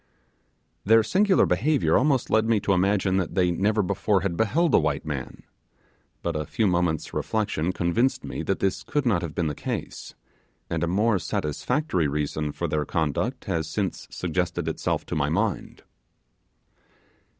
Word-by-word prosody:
Their 115 +2 +5
singular 190 - +3
behaviour 155 -1 +2
almost 135 -2 +2
led 110 0 +3
me 115 -2 +2
to 100 - +1
imagine 95 0 +2
that 95 -4 -2
they 90 -2 +3
never 105 +4 +1
before 95 +1 +1
had 95 -3 -1
beheld 150 - +1
a - - +7
white 75 -2 -1
man; 70 -4 -5 0.8
but - - -2
a 75 -1 -3
few 110 - 0
moments' 85 -4 0
reflection 95 -6 -1
convinced 95 +10 0
me - - -5
that - - -2
this 95 -1 0
could 145 +6 -2
not 105 -8 +2
have 85 -4 -5
been 85 - 0
the 75 - -1
case; - - -6 0.6
and - - -1
a - - +1
more 100 +3 +2
satisfactory 85 - -1
reason 75 +1 -2
for - - -3
their 75 -1 0
conduct 75 -1 -2
has 80 -2 -1
since 95 +3 -3
suggested 90 -1 -2
itself 80 - -2
to - - -4
my - - +1
mind. - - -2
95 Hz, 160 wpm, -25 LUFS, 80-110 Hz, 0.8 s, a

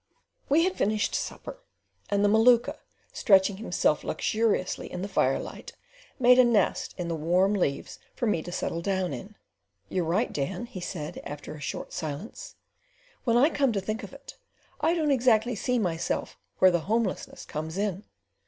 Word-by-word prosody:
We 305 +4 +5
had 370 +1 0
finished 215 +1 +1
supper, - - -4 0.5
and 205 0 +2
the - - +5
Maluka 230 +3 +4 0.3
stretching 195 -2 +4
himself 175 -7 0
luxuriously 215 +2 -1
in 180 - -4
the - - -2
firelight, 135 -9 -1 0.4
made 250 0 +6
a - - +9
nest 235 -3 +1
in 180 -2 -3
the 170 - -2
warm 180 +6 +2
leaves 160 -9 -2 0.2
for - - -2
me 210 -7 +1
to 175 - -8
settle 170 -1 -2
down 190 -1 -1
in. 205 +2 -8 0.5
"You're 185 - 0
right, 185 +9 0
Dan," 175 +9 -3
he 235 -6 -8
said, 155 -4 -5
after 145 +1 -7
a 155 - -10
short - - -5
silence, 155 +7 -6 0.7
"when 235 -1 +3
I 285 +7 +5
come 275 -4 +2
to 200 - 0
think 215 +4 -3
of - - -9
it; - - -12 0.4
I 325 +3 +2
don't 310 -3 +1
exactly 245 -2 +3
see 250 +3 -1
myself 175 -7 -2 0.2
where 185 - +6
the 175 - +2
homelessness 225 -3 -1
comes 160 +3 -5
in. 200 -1 -2
200 Hz, 170 wpm, -27 LUFS, 175-235 Hz, 0.7 s, a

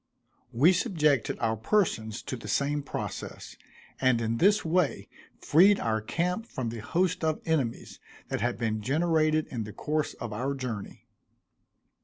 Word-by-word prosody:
We 150 +10 +5
subjected 155 - +1
our 110 -1 0
persons 110 - 0
to - - -4
the 120 - -9
same 145 +1 0
process, 140 - -6 0.4
and 130 -3 +3
in 115 0 -1
this 205 - +3
way 165 -2 +1 0.3
freed 195 +6 +5
our 110 -1 0
camp 180 - -2
from 120 -3 -4
the 115 0 -6
host 180 - 0
of 155 -1 +1
enemies 140 -8 -2 0.3
that - - -2
had 120 0 0
been 110 -2 -1
generated 155 +4 +2
in 115 -3 -3
the 105 0 -8
course 155 0 -2
of 115 -2 -6
our 130 +6 -2
journey. 120 -6 -6
140 Hz, 150 wpm, -28 LUFS, 115-165 Hz, 0.4 s, We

